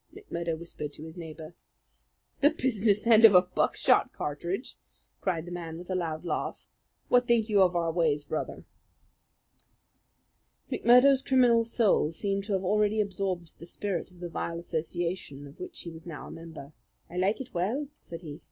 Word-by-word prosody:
McMurdo 170 - -4
whispered 160 -3 -6
to 150 - -10
his 160 +1 -9
neighbour. 160 -1 -9 0.9
"The 290 - +6
business 225 -9 +1
end 230 -1 +6
of 215 -4 +9
a 180 - +8
buckshot 180 - +2
cartridge!" 170 - -4 0.4
cried 170 -4 -1
the 175 - -8
man 165 -2 -6
with 175 +2 -8
a - - 0
loud 165 -2 -3
laugh. - - -3 0.4
"What 245 0 +3
think 230 -2 +3
you 205 -2 +4
of 180 -1 +4
our 170 -1 +1
ways, 155 -4 +1
Brother?" 155 - -4 2.1
McMurdo's 260 +3 +6
criminal 245 -4 +4
soul 225 -8 +2
seemed 195 +3 -2
to 210 - -2
have 190 -1 0
already 210 +2 +2
absorbed 190 -4 -2
the 170 - -9
spirit 190 -1 -3
of 180 -1 -18
the 175 - -4
vile 170 0 -3
association 170 -3 -4
of 140 - -14
which 365 -2 -7
he 170 - -7
was 165 +1 -11
now 160 -3 -7
a - - -9
member. 165 -3 -10 0.3
"I 175 - -9
like 195 +6 +1
it 255 -1 -8
well," 220 +12 -1
said 165 +1 -9
he. 150 -2 -8
180 Hz, 170 wpm, -28 LUFS, 165-215 Hz, 2.1 s, of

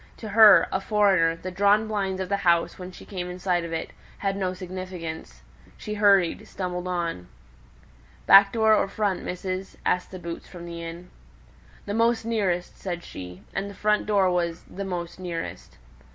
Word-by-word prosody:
To 220 - -7
her, 210 -4 +8
a 190 - -1
foreigner, 195 -6 +3
the 185 +2 -7
drawn 205 +3 +3
blinds 195 -3 -2
of 190 - -2
the 200 - 0
house, 170 -3 +1
when 180 0 -7
she - - -13
came 180 -3 -5
in 180 - -6
sight 180 -1 0
of 170 - -6
it, 165 0 -4 0.3
had 195 -1 -1
no 185 -2 -2
significance; 180 - -7 0.3
she 210 - -6
hurried, 200 -4 +3
stumbled 180 -1 -4
on. 170 - -3 1.0
"Back 195 0 +8
door 220 -1 +4
or 210 - +3
front, 200 -1 -1
missus?" 185 +1 -5
asked 180 - +1
the 185 - -8
boots 170 -1 -7
from 175 -2 -10
the 170 -1 -7
inn. 170 +2 -8 0.7
"The 205 - -3
most 230 0 +2
nearest," 195 -6 -1
said 175 -2 -5
she. 90 +1 -9
And 195 +1 -3
the 200 - -11
front 210 0 +1
door 195 -3 +3
was 170 -1 -1
"the 200 +1 -7
most 175 -2 -5
nearest." 175 -2 -6
185 Hz, 180 wpm, -25 LUFS, 175-200 Hz, 1.0 s, her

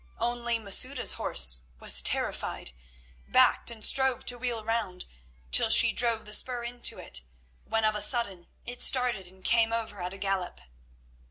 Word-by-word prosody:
Only 235 0 -2
Masouda's 250 +5 +2
horse - - +4 0.2
was - - +2
terrified, - - -3 0.6
backed, - - +2
and 225 -2 -3
strove 265 -2 +2
to 245 - +2
wheel 235 -3 -4
round, 215 -5 -2 0.5
till - - +4
she - - +6
drove 230 -2 0
the 210 - -8
spur 245 +1 0
into 240 0 -2
it, 60 - -3 0.4
when 225 0 -2
of 215 - +1
a 210 - -3
sudden 205 -5 -1 0.2
it 245 0 -8
started 245 -8 -1
and 185 +1 -16
came 230 -1 +2
over 220 -4 -4
at 180 +1 -6
a - - -12
gallop. 195 -2 -4
225 Hz, 160 wpm, -26 LUFS, 195-240 Hz, 0.6 s, she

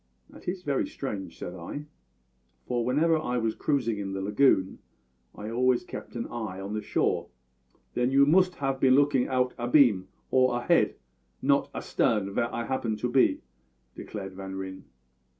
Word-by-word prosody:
"That - - -15
is 180 +1 -3
very 140 -2 0
strange," 100 -10 -6
said 90 - -6
I, 95 - -7 0.8
"for 120 -1 -1
whenever 155 +6 +2
I 125 -5 -2
was 115 -2 0
cruising 120 -8 0
in 95 -1 -4
the 95 - -3
lagoon 100 -2 +3 0.6
I 105 +2 -6
always 125 +1 +2
kept - - -9
an 115 - -3
eye 110 -6 -5
on 100 +2 -5
the 110 - -2
shore." - - 0 0.7
"Then 125 +1 +1
you 140 +1 +5
moost 180 +4 +3
'ave 135 -1 0
been 130 -1 +5
lookin' 140 -2 +3
out 125 -1 +1
abeam, 120 -6 +4 0.2
or 130 -1 +3
ahead, 120 - +2 0.5
not - - +3
astarn, 100 -3 0
vhere 120 +2 0
I 115 0 -3
'appened 115 -4 -1
to 125 - 0
be," 130 - +3 0.5
declared 95 -3 -7
Van 95 0 -7
Ryn. 95 0 -7
120 Hz, 165 wpm, -28 LUFS, 100-135 Hz, 0.8 s, you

